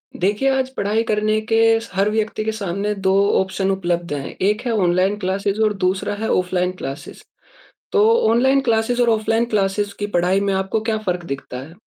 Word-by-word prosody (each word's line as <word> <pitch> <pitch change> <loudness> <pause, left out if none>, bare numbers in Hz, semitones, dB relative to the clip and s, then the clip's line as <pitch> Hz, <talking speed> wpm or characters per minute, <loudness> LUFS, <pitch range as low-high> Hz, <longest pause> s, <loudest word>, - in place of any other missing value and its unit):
देखिए, 205 +8 +1
आज 260 -1 -1
पढ़ाई 210 +3 0
करने 215 -1 +1
के 225 0 +4
स 225 - -10
हर 195 +2 +2
व्यक्ति 215 0 -1
के 220 - 0
सामने 205 -1 -3
2 190 - +4 0.3
ऑप्शन 190 0 -1
उपलब्ध 175 -4 -2
हैं, 140 -2 -5
एक 210 +4 +1
है 240 - 0
ऑनलाइन 185 0 +1
क्लासेज़ 200 +2 -1
और 215 -1 +3
दूसरा 190 +2 0
है 220 - -1
ऑफ़लाइन 180 0 0
क्लासेस। 135 -3 -7 0.7
तो 420 -1 +4 0.3
ऑनलाइन 265 +4 +3
क्लासेस 225 +2 +1
और 240 - +3
ऑफ़लाइन 225 +1 +1
क्लासेस 200 -1 0
की 205 - -2
पढ़ाई 180 +3 +2
में 200 0 0
आपको 190 +3 -1
क्या 220 0 -1
फ़र्क 180 -1 -1
दिखता 135 -2 -8
है? 160 - -15
205 Hz, 185 wpm, -20 LUFS, 190-220 Hz, 0.7 s, के